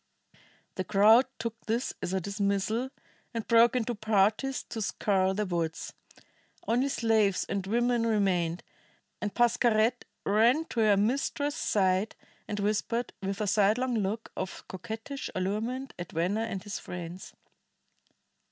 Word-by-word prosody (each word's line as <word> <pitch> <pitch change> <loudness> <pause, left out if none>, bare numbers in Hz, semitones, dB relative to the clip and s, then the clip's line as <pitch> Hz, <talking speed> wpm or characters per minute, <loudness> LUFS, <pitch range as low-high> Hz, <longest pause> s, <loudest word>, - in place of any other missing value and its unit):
The 185 - 0
crowd 215 +6 +5
took 230 0 -5
this 230 +3 -1
as - - -3
a 190 - +1
dismissal, 200 +5 -1 0.5
and 230 - -2
broke 235 +2 +5
into 240 -1 0
parties 215 +5 +1
to 225 - -4
scour 190 -2 +1
the 210 +1 0
woods. 170 -3 -3 0.7
Only 250 +4 +2
slaves 220 -6 +2
and 195 -1 -3
women 240 +1 +1
remained, 180 -6 +1 0.6
and 210 - -2
Pascherette 240 0 +2 0.2
ran 235 +10 +4
to 235 - -3
her 210 -2 +4
mistress's 280 +6 0
side 190 +1 +1 0.3
and 210 -1 -3
whispered, 215 +4 -1
with 195 +1 -3
a - - +1
sidelong 215 +5 +2
look 215 0 -2
of 190 - -6
coquettish 225 +7 -6
allurement 220 +8 -2
at 175 - -6
Venner 190 +7 0
and 195 -5 -5
his 205 - -5
friends. 180 +1 -8
215 Hz, 135 wpm, -29 LUFS, 195-235 Hz, 0.7 s, crowd